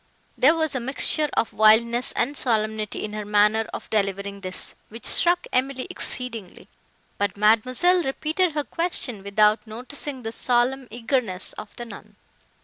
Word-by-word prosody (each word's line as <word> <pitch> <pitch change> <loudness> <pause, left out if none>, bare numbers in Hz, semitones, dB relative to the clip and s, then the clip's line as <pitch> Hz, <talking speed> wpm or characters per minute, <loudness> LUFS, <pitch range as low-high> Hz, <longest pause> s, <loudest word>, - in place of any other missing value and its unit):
There 295 +6 +5
was 315 -2 0
a 260 - -1
mixture 280 +4 +2
of 225 - 0
wildness 235 +3 +4
and 280 +4 -1
solemnity 215 -5 -1
in 210 - -8
her 215 0 -4
manner 210 +2 +2
of - - -7
delivering 200 -1 -2
this, 185 -1 -3 0.2
which 230 +1 -11
struck 350 +1 +4
Emily 260 0 0
exceedingly; 230 -7 -6 0.5
but 205 -1 -1
Mademoiselle 255 - +3
repeated 315 +4 -1
her 295 -1 -1
question, 285 - -3
without 210 +3 +2
noticing 255 +4 -6
the 225 - -4
solemn 250 +3 0
eagerness 225 -4 -2
of 210 0 -10
the 240 - -7
nun. 230 - -12
235 Hz, 145 wpm, -24 LUFS, 210-270 Hz, 0.5 s, There